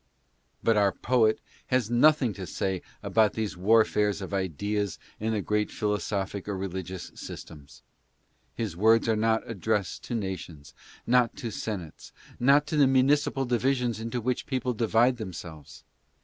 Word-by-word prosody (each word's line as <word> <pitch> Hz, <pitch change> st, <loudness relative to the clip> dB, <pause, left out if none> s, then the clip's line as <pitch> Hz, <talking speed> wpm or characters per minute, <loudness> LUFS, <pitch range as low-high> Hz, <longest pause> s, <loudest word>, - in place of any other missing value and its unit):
But 115 Hz, -1 st, +3 dB
our 100 Hz, -1 st, +4 dB
poet 115 Hz, -2 st, +2 dB, 0.3 s
has 125 Hz, -3 st, +1 dB
nothing 130 Hz, -1 st, +4 dB
to 95 Hz, -2 st, -7 dB
say 95 Hz, -2 st, -2 dB, 0.2 s
about 110 Hz, -2 st, +3 dB
these 110 Hz, -3 st, -3 dB
warfares 105 Hz, +1 st, +3 dB
of 95 Hz, 0 st, -7 dB
ideas 100 Hz, +1 st, -2 dB, 0.2 s
in 110 Hz, +1 st, -1 dB
the 105 Hz, -3 st, -1 dB
great 105 Hz, 0 st, 0 dB
philosophic 105 Hz, -2 st, -2 dB
or 100 Hz, -, -2 dB
religious 95 Hz, -1 st, -5 dB
systems. 75 Hz, -2 st, -10 dB, 0.7 s
His 110 Hz, -7 st, -3 dB
words 110 Hz, +5 st, +4 dB
are 110 Hz, -, +3 dB
not 110 Hz, +1 st, +1 dB
addressed 105 Hz, -2 st, -2 dB
to 120 Hz, -, -3 dB
nations; 90 Hz, -8 st, -5 dB, 0.3 s
not 125 Hz, -1 st, +3 dB
to 120 Hz, -6 st, -4 dB
senates; 95 Hz, -7 st, -6 dB, 0.3 s
not 140 Hz, +4 st, +5 dB
to 150 Hz, 0 st, -2 dB
the 140 Hz, -2 st, +6 dB
municipal 135 Hz, +1 st, +2 dB
divisions 125 Hz, -1 st, 0 dB
into 115 Hz, +2 st, -3 dB
which 125 Hz, +2 st, -2 dB
people 130 Hz, -2 st, -1 dB
divide 115 Hz, +2 st, +2 dB
themselves. 80 Hz, -, -9 dB
110 Hz, 145 wpm, -27 LUFS, 95-120 Hz, 0.7 s, the